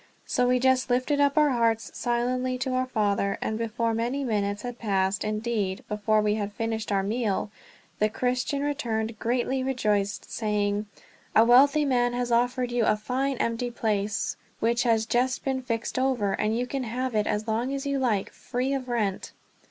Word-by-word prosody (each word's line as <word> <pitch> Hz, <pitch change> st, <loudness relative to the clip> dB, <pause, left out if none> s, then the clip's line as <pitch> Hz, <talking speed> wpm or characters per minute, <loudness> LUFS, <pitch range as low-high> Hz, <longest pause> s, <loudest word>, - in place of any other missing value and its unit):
So 250 Hz, -, +1 dB
we 250 Hz, 0 st, +4 dB
just 260 Hz, 0 st, +2 dB
lifted 255 Hz, +4 st, +1 dB
up 285 Hz, +1 st, +2 dB
our 300 Hz, -2 st, +5 dB
hearts 230 Hz, -2 st, +1 dB
silently 250 Hz, +1 st, 0 dB
to 255 Hz, +1 st, -2 dB
our 255 Hz, 0 st, 0 dB
Father; 200 Hz, -4 st, 0 dB
and 220 Hz, -, -2 dB
before 230 Hz, 0 st, -1 dB
many 240 Hz, +5 st, -1 dB
minutes 205 Hz, -4 st, -1 dB
had 245 Hz, -1 st, -6 dB
passed, 195 Hz, -2 st, 0 dB
indeed 215 Hz, -1 st, -2 dB
before 215 Hz, 0 st, +1 dB
we 210 Hz, 0 st, +2 dB
had 210 Hz, -1 st, -2 dB
finished 225 Hz, 0 st, -3 dB
our 195 Hz, -1 st, +2 dB
meal, 210 Hz, -1 st, -1 dB, 0.5 s
the 215 Hz, -, +3 dB
Christian 250 Hz, +5 st, -1 dB
returned 230 Hz, -7 st, -2 dB
greatly 250 Hz, +2 st, 0 dB
rejoiced, 210 Hz, -6 st, -1 dB
saying: 210 Hz, -1 st, -1 dB, 0.5 s
"A 225 Hz, -, +7 dB
wealthy 280 Hz, +5 st, +6 dB
man 245 Hz, -3 st, +2 dB
has 245 Hz, 0 st, -2 dB
offered 245 Hz, +1 st, +1 dB
you 240 Hz, -1 st, +1 dB
a 215 Hz, -, +3 dB
fine 260 Hz, +5 st, -1 dB
empty 230 Hz, +1 st, -1 dB
place 210 Hz, -3 st, -1 dB, 0.2 s
which 235 Hz, +2 st, +2 dB
has 225 Hz, -2 st, +2 dB
just 245 Hz, +2 st, 0 dB
been 265 Hz, -1 st, 0 dB
fixed 230 Hz, 0 st, -2 dB
over. 245 Hz, -7 st, +1 dB
And 215 Hz, +3 st, 0 dB
you 245 Hz, -, 0 dB
can 270 Hz, +2 st, -3 dB
have 250 Hz, +2 st, -2 dB
it 210 Hz, -1 st, +1 dB
as 210 Hz, +2 st, -1 dB
long 230 Hz, +4 st, 0 dB
as 275 Hz, 0 st, -3 dB
you 280 Hz, -1 st, 0 dB
like, 220 Hz, -7 st, 0 dB
free 255 Hz, +2 st, -2 dB
of 260 Hz, -2 st, -3 dB
rent." 210 Hz, -5 st, -1 dB
235 Hz, 180 wpm, -26 LUFS, 215-255 Hz, 0.5 s, A